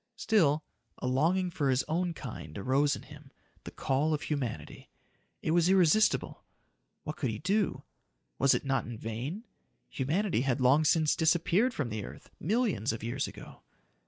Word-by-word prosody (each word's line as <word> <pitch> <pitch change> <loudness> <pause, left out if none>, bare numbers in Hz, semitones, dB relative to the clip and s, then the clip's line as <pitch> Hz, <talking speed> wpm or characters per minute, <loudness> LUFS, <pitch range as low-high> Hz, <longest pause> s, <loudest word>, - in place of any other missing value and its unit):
Still, 160 -11 +2 0.3
a - - -6
longing 170 +8 +1
for 150 -6 0
his 130 0 +2
own 170 +1 -1
kind 125 -7 -8
arose 135 +7 +2
in - - -10
him 145 -1 -14 0.3
the - - -5
call 150 +4 0
of 150 - -6
humanity. 125 - -4 0.5
It - - 0
was 170 +1 +3
irresistible. 190 +2 +3 0.6
What 150 - -5
could 130 - -1
he 110 - -3
do? 195 - 0 0.6
Was 135 0 +4
it - - -3
not 135 0 0
in 115 -1 -7
vain? 120 - -5 0.5
Humanity 160 - 0
had 135 0 0
long 135 +5 +4
since 155 0 +3
disappeared 175 +9 +2
from 140 -6 -2
the 110 -1 -4
earth - - -11
millions 200 - 0
of 115 -1 -6
years 120 +4 -2
ago. - - -12
150 Hz, 160 wpm, -30 LUFS, 130-175 Hz, 0.6 s, Was